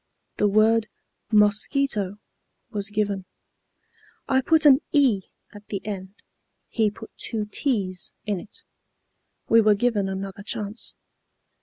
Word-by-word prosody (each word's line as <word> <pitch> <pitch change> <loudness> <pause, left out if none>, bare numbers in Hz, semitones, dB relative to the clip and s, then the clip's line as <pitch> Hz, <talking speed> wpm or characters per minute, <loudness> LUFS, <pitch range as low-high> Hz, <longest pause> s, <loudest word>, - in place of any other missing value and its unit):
The 210 - +3
word 215 +2 +4 0.4
'mosquito' 210 0 +2 0.5
was 205 -1 -2
given. 205 -2 -1 1.0
I 265 0 +3
put 315 +3 +3
an 275 0 +7
'e' 255 -10 +3 0.2
at 205 0 -13
the 200 - -3
end; 195 -2 -6 0.5
he 220 -3 +2
put 220 +2 -12
two 220 -3 -2
't's' 205 -6 -2
in 205 -3 -1
it. 210 - -14 0.8
We 230 0 +6
were 215 -1 +5
given 205 -3 +1
another 195 +1 -5
chance. 210 +1 -5
210 Hz, 120 wpm, -24 LUFS, 200-230 Hz, 1.0 s, an